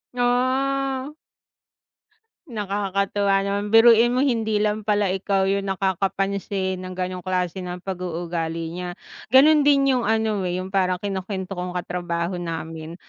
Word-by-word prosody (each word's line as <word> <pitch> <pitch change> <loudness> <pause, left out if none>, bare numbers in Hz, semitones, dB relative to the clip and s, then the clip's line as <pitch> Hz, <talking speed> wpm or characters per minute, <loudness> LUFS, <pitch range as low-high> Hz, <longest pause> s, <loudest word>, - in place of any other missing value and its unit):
Ah. 265 +3 0 1.3
Nakakatuwa 200 -2 0
naman, 200 +1 -1
biruin 230 +1 +7
mo 255 - +3
hindi 225 -5 +1
lang 210 0 0
pala 205 -2 +2
ikaw 195 0 0
'yung 195 0 0
nakakapansin 195 0 -1
ng 185 0 -7
gano'ng 185 0 -3
klase 180 0 -2
ng 180 0 -5
pag-uugali 170 -3 -4
niya, 180 0 -5 0.3
gano'n 300 +4 +7
din 275 -1 +4
'yung 250 - +1
ano, 220 -2 +1
eh, 175 - -2
'yung 185 +1 -5
parang 185 -2 +2
kinukuwento 190 -1 -4
kong 180 0 -4
katrabaho 175 0 -3
namin. 165 -1 -6
195 Hz, 130 wpm, -23 LUFS, 180-220 Hz, 1.3 s, biruin